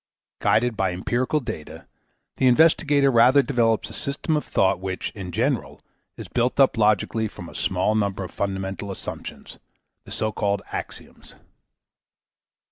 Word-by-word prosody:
Guided 120 +1 +2
by 95 -3 0
empirical 120 +10 0
data, 110 - -7 0.5
the 130 - +3
investigator 145 0 +4
rather 125 +4 +6
develops 115 -4 +1
a - - -11
system 140 +3 -2
of 150 - 0
thought 95 -2 +1
which, 95 0 -4
in 95 -4 -7
general, - - -1 0.4
is - - -8
built 125 +2 0
up 135 - +5
logically 110 0 +2
from 90 -4 -10
a - - -12
small 95 +3 0
number 100 -2 -1
of 90 - -8
fundamental 95 0 -3
assumptions, 95 - -8 0.5
the - - -13
so 110 0 -1
called 100 -1 -1
axioms. - - -8
110 Hz, 140 wpm, -24 LUFS, 95-130 Hz, 0.5 s, rather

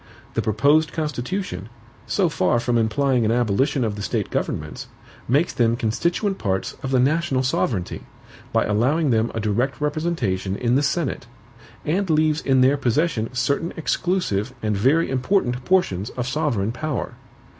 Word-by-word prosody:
The - - 0
proposed 145 +9 +2
Constitution, 150 - -3 0.4
so 195 -3 +2
far 120 - +1
from 120 0 0
implying 120 +3 +2
an 110 - +2
abolition 120 +3 +1
of 110 -3 -1
the 105 - -6
State - - -2
governments, 75 0 -3 0.4
makes 145 +8 +2
them 115 -1 +2
constituent 170 - -1
parts 95 -3 -1
of 135 - -4
the 130 -1 +2
national 140 0 +2
sovereignty, 110 -7 -1 0.5
by - - +2
allowing 130 +8 +2
them 115 0 +1
a - - -1
direct 120 +4 0
representation 145 - -1
in 120 +2 0
the 135 - +4
Senate, 145 -4 -1 0.6
and 185 +5 0
leaves 155 0 +2
in 130 -2 +3
their 135 +3 +4
possession 130 -2 0
certain 140 +7 0
exclusive 150 - -1
and 105 -1 0
very 135 +11 +3
important 130 -1 0
portions 110 - +1
of 125 -1 -4
sovereign 130 -8 0
power. 150 +2 -3
130 Hz, 150 wpm, -22 LUFS, 110-155 Hz, 0.6 s, the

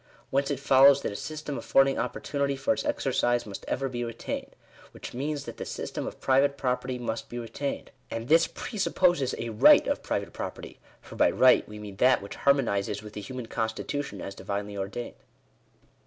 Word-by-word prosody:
Whence 140 +2 +1
it 140 -3 -1
follows 140 0 +6
that - - -1
a - - -7
system 150 +3 -5
affording 135 0 +3
opportunity 140 -1 -1
for 280 - +1
its - - -3
exercise 125 - 0
must 100 -2 -8
ever 135 +1 -1
be 120 -2 -3
retained; 115 -1 -5 0.4
which - - -9
means, 140 +3 -3
that - - -8
the - - -4
system - - -5
of - - -7
private 140 +1 +3
property 125 -1 -1
must 115 -2 -4
be 120 - -6
retained; 120 +4 -4 0.2
and 115 +1 -5
this 165 +3 +5
presupposes 180 - 0
a 115 - -4
right 110 -1 +6
of - - -1
private - - -3
property, - - -7 0.3
foi^by - - +1
right 130 -3 +6
we 105 - -8
mean 105 -2 -9
that 130 +4 +5
which 100 - -8
harmonizes 105 -7 +1
with 105 0 -10
the 105 - -6
human 125 +4 -6
constitution 110 0 -3
as 100 - -6
divinely 100 +1 -4
ordained.) 100 +5 -5
125 Hz, 180 wpm, -28 LUFS, 110-140 Hz, 0.4 s, follows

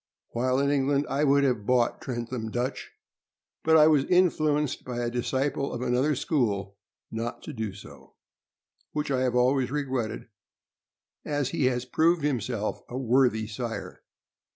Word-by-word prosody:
While 130 +2 0
in 140 0 +2
England, 140 0 +2
I 140 +2 +1
would 140 -1 +4
have 120 -7 0
bought 125 -2 +2
Trentham 120 -2 -4
Dutch, 120 +4 -3 0.7
but 160 0 +5
I 150 - +7
was 150 -3 +4
influenced 155 -5 +2
by 125 -1 -5
a 120 -1 -1
disciple 130 +3 -1
of 120 - -4
another 130 +4 +1
school 105 -9 -1 0.4
not 115 +2 -4
to - - -7
do 110 -3 -3
so, 100 - -14 0.8
which 150 -1 -2
I 130 -1 +1
have 125 -1 +1
always 125 +1 +3
regretted, 130 -6 -3 1.0
as 145 -3 -1
he 135 - 0
has 125 -1 0
proved 160 +5 +2
himself 120 -6 -1
a 125 - -5
worthy 125 -3 +2
sire. 115 +1 -6
130 Hz, 150 wpm, -27 LUFS, 120-140 Hz, 1.0 s, I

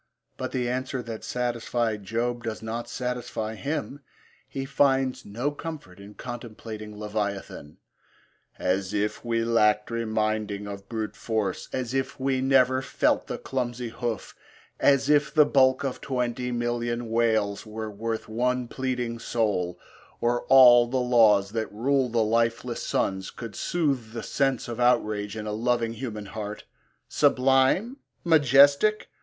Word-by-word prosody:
But - - -4
the 125 -2 -1
answer 130 +1 -2
that 115 -1 -7
satisfied 120 -3 -2
Job 120 +3 -2
does 110 -1 -5
not 115 +2 -4
satisfy 125 -3 -3
him. 140 +3 -4 0.5
He 135 0 -5
finds 135 -2 +1
no 120 +8 -2
comfort 145 - -8
in 100 +1 -12
contemplating 110 -3 -8
Leviathan: 100 -7 -4 0.8
As 95 +2 -1
if 105 +1 -1
we 115 -1 0
lacked 105 -2 +2
reminding 110 -2 -1
of 100 -1 -8
brute 110 -2 -4
force, 110 -5 -2
As 125 -1 -3
if 135 0 -2
we 130 -1 0
never 130 -1 +4
felt - - +1
the - - -4
clumsy 120 -2 -3
hoof, 115 -1 -4 0.4
As 140 -1 +4
if 150 0 +3
the 155 -2 +6
bulk 130 -2 +3
of 135 -2 -3
twenty 125 -1 -2
million 120 -1 -2
whales 110 -3 +1
Were 110 0 -5
worth 110 +2 -4
one 125 +2 0
pleading 125 -2 -3
soul, 100 -7 -1 0.4
or 120 +1 0
all 120 -2 +8
the 130 +2 -1
laws 110 -6 +4
That 110 0 -3
rule 130 +4 +1
the 115 -1 +2
lifeless 115 +2 0
suns 95 -1 -1
could 115 -3 -8
soothe 135 -10 -1
the 115 -2 -5
sense 135 -3 0
Of 120 0 -5
outrage 110 -4 +1
in 105 - -5
a 105 - -3
loving 115 +1 0
human 110 -3 -6
heart! 105 0 -6 0.4
Sublime? 135 - +3 0.3
majestic? 145 - +5
120 Hz, 140 wpm, -26 LUFS, 110-130 Hz, 0.8 s, all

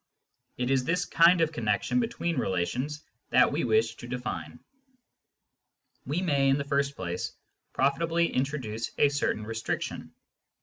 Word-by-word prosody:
It 125 +1 -1
is 130 -1 +3
this 175 +5 0
kind 170 +1 +5
of 160 -1 +2
connection 120 - 0
between 225 -8 -1
relations 125 - -2 0.3
thaV - - +5
we - - -1
wish 440 +1 +2
to - - -9
define. - - -5 1.5
We 165 +6 -1
may, 140 -5 +2
in 135 - +4
the 140 - -2
first 140 0 0
place, 90 -1 -4 0.4
profitably 165 +5 +1
introduce 125 -5 -2
a 145 - +5
certain 140 -6 -1
restriction. 115 0 -4
140 Hz, 135 wpm, -28 LUFS, 125-165 Hz, 1.5 s, kind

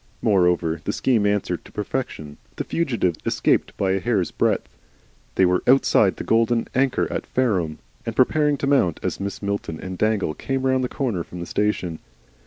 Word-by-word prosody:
Moreover, 90 -5 +2
the - - -2
scheme 115 -6 +2
answered 100 -4 -1
to - - -15
perfection. 105 - -4 0.2
The - - -3
fugitives 115 - -1
escaped - - +1
by 95 -1 +1
a 95 - +1
hair's 100 -7 0
breadth. - - 0 0.7
They 95 - +5
were 90 0 +2
outside 135 +2 +4
the - - -6
Golden 115 +1 +2
Anchor 130 0 +1
at - - -3
Fareham, 95 -12 0 0.3
and 115 - -4
preparing 150 +3 +3
to 140 - -2
mount, 135 - +2
as - - -2
Mrs. 100 +1 -5
Milton 100 -5 -3
and 95 -1 -7
Dangle 110 -7 +1
came 135 +7 -3
round 130 -1 +2
the 125 - -1
corner 115 -11 -2
from 90 - -10
the 85 - -4
station. 90 -5 -1
105 Hz, 180 wpm, -23 LUFS, 90-130 Hz, 0.7 s, They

